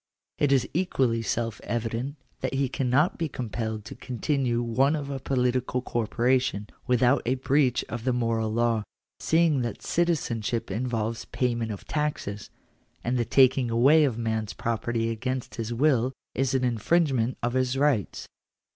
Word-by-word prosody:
It 145 -2 +3
is 135 -3 +3
equally 135 -9 +1
self 115 +1 -2
evident 120 +4 -3 0.2
that - - -2
he 135 -1 +1
cannot 135 +7 +1
be 165 -2 -1
compelled 110 -4 -4
to - - -7
continue 125 -1 -1
one 130 +6 +2
of 140 -2 -4
a 135 - -3
political 125 -1 0
corporation, 120 -2 0 0.2
without 125 +2 +3
a 125 +2 +1
breach 130 -1 +2
of 120 0 -5
the 130 - +1
moral 115 -2 0
law, 115 -1 +1 0.4
seeing 160 -4 +3
that 120 -1 -4
citizenship 125 -9 -1
involves 115 -1 -2
payment 120 -3 -1
of 100 - -7
taxes; 150 -10 -3 0.5
and 120 +2 0
the 120 - +1
taking 130 +1 +4
away 135 +7 +5
of 135 -6 +1
a - - -7
man's 110 -2 -2
property 115 0 -1
against 130 +3 -3
his 115 +1 -4
will, 130 0 +2 0.2
is 135 0 0
an 130 - +1
infringement 125 +1 +1
of 120 0 0
his 130 0 +1
rights 135 - +1
(p. - - -19
125 Hz, 155 wpm, -27 LUFS, 115-135 Hz, 0.5 s, away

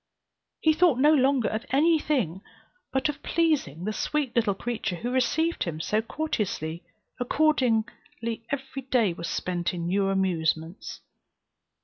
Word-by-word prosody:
He 315 - +4
thought 330 -5 +4
no 295 +4 +5
longer 270 -4 +3
of 220 +1 -2
any 315 +4 +4
thing 215 - -1 0.5
but 265 +2 +1
of 295 0 -4
pleasing 300 - 0
the 215 +2 -2
sweet 290 +1 -1
little 215 -4 +2
creature 230 -4 -3
who 240 +8 -4
received 320 +6 +1
him 160 -3 -4
so 210 +7 0
courteously; 210 - -3 0.4
accordingly 235 -4 0
every 270 -1 -4
day 230 -9 +3
was 170 0 -5
spent 180 0 -2
in 170 -1 -4
new 195 +3 +1
amusements. 170 -3 -1
235 Hz, 135 wpm, -27 LUFS, 185-285 Hz, 0.5 s, no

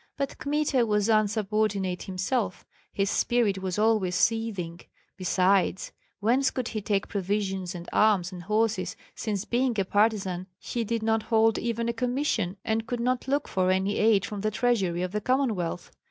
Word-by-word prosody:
But 275 -1 -3
Kmita 285 -1 +1
was 210 0 +1
insubordinate 210 -3 +1
himself, 190 +1 -2 0.3
his 195 0 0
spirit 225 -5 +1
was 190 0 -3
always 210 -4 +2
seething; 195 -6 0 0.4
besides, 190 +1 +1 0.3
whence 250 +6 +3
could 255 -3 -3
he 215 - -3
take 200 -1 0
provisions 195 -2 -2
and 175 0 -8
arms 200 -4 +3
and 180 -1 -8
horses, 215 +4 0 0.2
since 205 -3 -3
being 240 -2 0
a 195 - +1
partisan 195 -3 +1
he 235 - -3
did 230 0 -2
not 220 0 +2
hold 225 0 +2
even 235 0 -2
a 235 - 0
commission, 245 -6 -1
and 220 0 -1
could 245 - -2
not 250 +2 0
look 280 +1 0
for 185 -1 +1
any 190 +2 +1
aid 210 -3 +4
from 205 -1 -5
the 215 - +1
treasury 200 -7 0
of 180 - -3
the 210 +1 -2
Commonwealth? 215 -9 -1
210 Hz, 165 wpm, -27 LUFS, 190-230 Hz, 0.4 s, aid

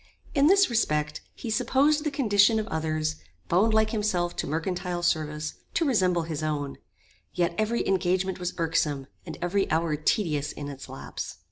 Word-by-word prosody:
In 285 0 +4
this 390 +2 +6
respect 150 - 0
he 230 - -5
supposed 275 +6 +2
the 305 - 0
condition 220 -6 +4
of 215 - -1
others, 155 -1 -1 0.3
bound 200 +6 +4
like 220 0 +3
himself 190 -6 0
to - - -2
mercantile 175 +3 -2
service, 155 -2 0 0.2
to 335 - +2
resemble 185 - +2
his 160 -2 -4
own; 145 -3 -3 0.6
yet 175 -1 +1
every 215 +4 0
engagement 185 0 +1
was 180 -1 -3
irksome, 155 -4 0 0.2
and 160 - -6
every 195 +3 +1
hour 160 -1 +1
tedious 150 -2 0
in 145 -1 -6
its 140 -1 -9
lapse. - - -7
175 Hz, 160 wpm, -27 LUFS, 155-215 Hz, 0.6 s, this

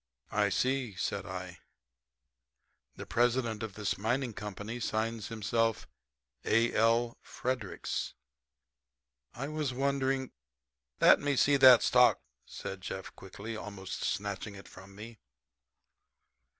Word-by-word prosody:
"I - - +2
see," 130 -5 0
said 95 0 -3
I, 90 -1 -7 1.4
"the - - -8
president 120 -2 +1
of 110 -4 -5
this 105 -3 -2
mining 120 +3 0
company 105 +3 -6
signs 110 -1 -2
himself 115 0 0 0.6
A. 115 +2 +2
L. 115 +1 +2
Fredericks. 125 -6 -3 1.2
I 135 +4 -4
was 150 -4 -2
wondering 135 -1 0 0.3
" - - -51
"Let - - +8
me 145 0 0
see 140 +2 +4
that 130 -3 +8
stock," 125 0 +5 0.3
said 95 0 -7
Jeff 95 0 -6
quickly, 100 +4 -8
almost 100 -3 -6
snatching 100 0 -3
it 100 - -12
from 95 +1 -14
me. 110 +1 -10
115 Hz, 115 wpm, -31 LUFS, 100-125 Hz, 1.4 s, Let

